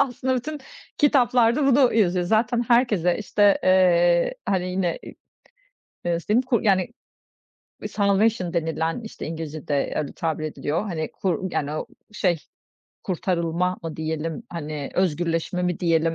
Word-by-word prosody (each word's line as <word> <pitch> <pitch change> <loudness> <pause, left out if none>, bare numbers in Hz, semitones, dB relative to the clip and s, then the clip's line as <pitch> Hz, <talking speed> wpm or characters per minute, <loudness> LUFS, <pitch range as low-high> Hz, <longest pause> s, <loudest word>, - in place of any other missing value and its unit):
Aslında 260 -1 0
bütün 300 +4 -4 0.4
kitaplarda 250 -2 +3
bunu 265 -2 +4
yazıyor. 180 -5 +2
Zaten 230 +4 +2
herkese, 215 -8 +3
işte, 205 -1 +3
eee, 175 -2 +4
hani, 185 -2 0
yine, 180 -2 -1 1.1
eee, 175 - +1
nasıl 170 - -4
diyeyim, 230 +5 +3 0.2
yani, 195 +1 +2 1.0
salvation 200 -2 +1
denilen, 165 +2 -1
işte, 220 -1 -8
İngilizce'de 155 -3 -3
öyle 145 - -2
tabir 160 -2 -3
ediliyor, 155 +2 -2
hani, 160 -4 -3
kur 185 0 -2
yani 145 0 -1
o 155 - -4 0.3
şey 180 -5 +1 0.7
kurtarılma 180 -1 -1
mı 165 -2 -6
diyelim, 160 0 -3
hani, 150 -4 -5
özgürleşme 175 0 0
mi 180 -1 -1
diyelim? 165 -2 +2
180 Hz, 125 wpm, -24 LUFS, 165-215 Hz, 1.1 s, bunu